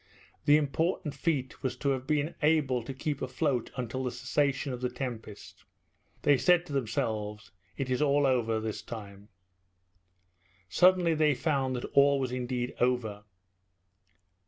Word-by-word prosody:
The 145 0 +7
important 155 +2 -1
feat 140 -6 -2
was 130 - -2
to 140 - -1
have 130 -1 -1
been 150 +1 0
able 150 -5 +2
to 120 - -7
keep 140 +2 -3
afloat 125 -1 -1
until 125 +1 -3
the 125 - -1
cessation 135 +2 -1
of 125 - -6
the 125 - 0
tempest. 120 -5 -7 0.6
They 145 -3 +4
said 175 +5 +4
to 150 - -8
themselves, 110 -4 -2 0.3
"It 130 -2 -2
is 125 - +1
all 145 -1 +3
over 115 -4 +1
this 110 -1 -4
time." 105 -2 -9 1.4
Suddenly 180 - +4
they 155 -2 +3
found 135 -2 0
that 125 - -4
all 140 0 +5
was 130 -2 -2
indeed 125 -1 -2
over. 115 -5 0
130 Hz, 145 wpm, -29 LUFS, 120-145 Hz, 1.4 s, The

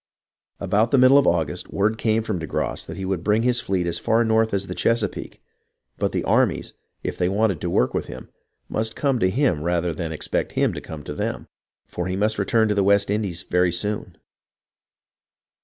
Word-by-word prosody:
About 110 +3 +1
the 140 - +3
middle 130 +2 +7
of - - +2
August, 80 -4 -1
word 110 +3 0
came 110 0 +1
from 105 -5 -2
de 80 - -5
Grasse - - -2
that - - -7
he 95 - -4
would 95 -3 -2
bring 105 +3 +2
his 125 -1 +2
fleet 95 -2 -1
as 85 0 -1
far 115 +1 +2
north 110 0 +2
as 100 -1 -1
the 90 - -5
Chesa 115 +2 +1
peake; - - -10 0.6
but - - 0
the - - -1
armies, - - +1 0.3
if - - -4
they 90 0 +2
wanted 100 -4 +1
to 85 - -2
work 65 -6 +1
with - - -2
him, - - -9 0.4
must 110 +1 -2
come 135 -4 +1
to 95 - +3
him 105 - +1
rather 85 +1 0
than 80 0 -4
expect 80 - -2
him - - +1
to - - -6
come 75 -2 -8
to 75 - -6
them, - - -4 0.4
for 90 0 -4
he 95 - -2
must 105 +2 0
return 110 +3 +2
to 105 - +1
the 100 -1 +2
West 100 0 +3
Indies 100 -5 -2
very 90 0 +2
soon. 95 0 -3
100 Hz, 210 wpm, -23 LUFS, 90-110 Hz, 0.6 s, middle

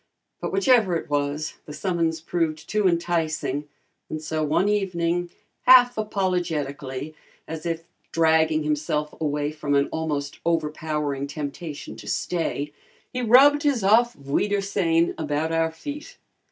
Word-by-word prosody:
But - - -3
whichever 245 - +4
it 160 - -4
was, 145 +2 -1
the 150 - -7
summons 165 0 -1
proved 160 -2 -2
too 210 -2 +2
enticing, 160 -4 -1 0.4
and 155 - -3
so 155 0 -2
one 155 +6 +2
evening, 175 -4 0 0.4
half 245 -1 +8
apologetically, 155 -9 -2 0.3
as 160 +1 -5
if 165 -1 -2 0.3
dragging 160 -1 +3
himself 150 0 -1
away 150 -1 0
from 150 -2 -1
an 140 0 +3
almost 150 -3 -3
overpowering 150 -3 -1
temptation 150 +1 -6
to - - -11
stay, 150 -4 -2 0.4
he 250 - -2
rubbed 270 +5 +6
his 280 -8 +1
"Aufwiedersehen" 195 - +2
about 155 +1 -1
our 165 0 +2
feet. 290 - -8
160 Hz, 125 wpm, -24 LUFS, 150-190 Hz, 0.4 s, half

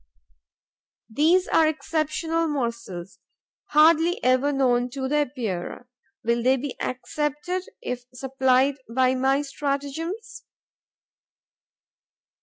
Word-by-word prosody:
These 330 +9 +3
are 320 - +4
exceptional 320 +1 -1
morsels, 235 - -4 0.5
hardly 325 +3 +4
ever 255 +3 +3
known 250 -3 +2
to 265 -1 -3
the 295 +3 +1
Epeirae. 230 -5 -5 0.4
Will 235 +1 +1
they 260 +3 +3
be 265 +1 -5
accepted, 295 +7 -3
if 245 0 -4
supplied 265 +1 +2
by 255 +2 +2
my 270 +2 +2
stratagems? 290 - -4
275 Hz, 90 wpm, -25 LUFS, 250-310 Hz, 0.5 s, are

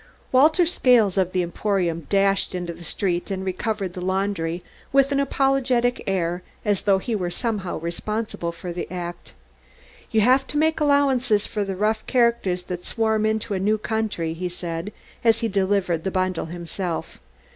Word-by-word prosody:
Walter 315 +7 +5
Scales 245 - +4
of 185 -2 +1
the 185 -1 +1
Emporium 175 -3 -1
dashed 195 -1 +2
into 175 -1 -3
the 170 +1 -12
street 175 +2 -1
and 190 -1 -3
recovered 190 0 -2
the 180 - -6
laundry 185 -2 -1 0.3
with 275 0 +4
an 280 - +2
apologetic 270 -3 +1
air 180 -2 0 0.2
as 205 -2 +1
though 200 -2 +3
he 225 +4 -2
were 180 -4 -1
somehow 205 -2 -2
responsible 170 +2 -3
for 175 +1 -7
the 175 - -5
act. 175 -1 -6 0.8
"You 220 - +3
have 260 +5 +4
to 295 - -3
make 315 +1 +2
allowances 270 -7 +3
for 210 - -2
the 195 -1 -3
rough 215 +3 0
characters 235 -8 +2
that 180 0 -5
swarm 220 -2 +1
into 220 -1 -1
a 190 - 0
new 210 +3 +2
country," 215 -7 -2
he 180 +2 -3
said, 170 +2 -5 0.3
as 230 0 +4
he 230 - +1
delivered 190 -4 +1
the 190 - 0
bundle 185 -3 -1
himself. 170 +1 -5
195 Hz, 165 wpm, -23 LUFS, 180-230 Hz, 0.8 s, Walter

